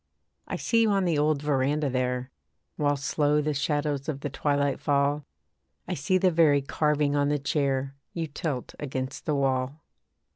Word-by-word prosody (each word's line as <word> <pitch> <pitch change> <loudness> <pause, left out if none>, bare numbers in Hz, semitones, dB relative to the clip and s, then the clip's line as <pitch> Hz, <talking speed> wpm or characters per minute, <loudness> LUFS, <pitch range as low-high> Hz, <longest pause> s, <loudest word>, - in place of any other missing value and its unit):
I - - -3
see 230 -1 +2
you 225 - +4
on 195 -2 +2
the 165 -4 +1
old 150 -1 +1
verandah 145 +1 +1
there, 125 0 -1 0.4
While 145 -1 +1
slow 145 +2 +1
the 150 0 0
shadows 145 0 -1
of 140 -3 -3
the 145 - -3
twilight 140 0 0
fall, 145 0 +1 0.6
I 180 - -2
see 175 +4 +1
the 185 0 +3
very 155 -4 +4
carving 150 0 +1
on 145 0 +2
the 145 - +2
chair 140 -2 0 0.2
You 165 -1 -3
tilt 145 -3 -4
against 130 -2 -4
the 150 - +2
wall. 135 +2 0
145 Hz, 170 wpm, -27 LUFS, 140-150 Hz, 0.6 s, you